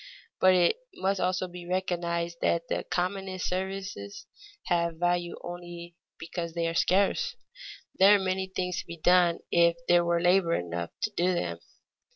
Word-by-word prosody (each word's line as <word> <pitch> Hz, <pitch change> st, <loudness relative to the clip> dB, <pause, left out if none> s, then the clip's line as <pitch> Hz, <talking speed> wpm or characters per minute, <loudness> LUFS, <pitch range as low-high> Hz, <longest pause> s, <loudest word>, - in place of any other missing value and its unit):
But 185 Hz, 0 st, +6 dB
it 180 Hz, -, +3 dB, 0.2 s
must 195 Hz, 0 st, 0 dB
also 185 Hz, +1 st, 0 dB
be 175 Hz, -1 st, -10 dB
recognized 170 Hz, -2 st, -2 dB
that 170 Hz, 0 st, 0 dB
the -, -, -1 dB
commonest 185 Hz, +1 st, -2 dB
services 190 Hz, -, -4 dB, 0.4 s
have 170 Hz, -2 st, 0 dB
value 175 Hz, 0 st, 0 dB
only 175 Hz, -1 st, -8 dB, 0.2 s
because 170 Hz, 0 st, -5 dB
they 170 Hz, -1 st, 0 dB
are 165 Hz, -, -2 dB
scarce. 200 Hz, -, +2 dB, 0.6 s
There 195 Hz, +2 st, +8 dB
are -, -, +2 dB
many 190 Hz, 0 st, -1 dB
things 180 Hz, -1 st, -3 dB
to -, -, -7 dB
be 170 Hz, 0 st, -8 dB
done 175 Hz, +1 st, +4 dB
if 170 Hz, 0 st, +4 dB
there 175 Hz, 0 st, +5 dB
were 170 Hz, 0 st, +1 dB
labor 175 Hz, -1 st, +3 dB
enough 85 Hz, -1 st, -3 dB
to 215 Hz, -, 0 dB
do 180 Hz, +1 st, +2 dB
them. 85 Hz, -, -3 dB
175 Hz, 160 wpm, -28 LUFS, 170-185 Hz, 0.6 s, There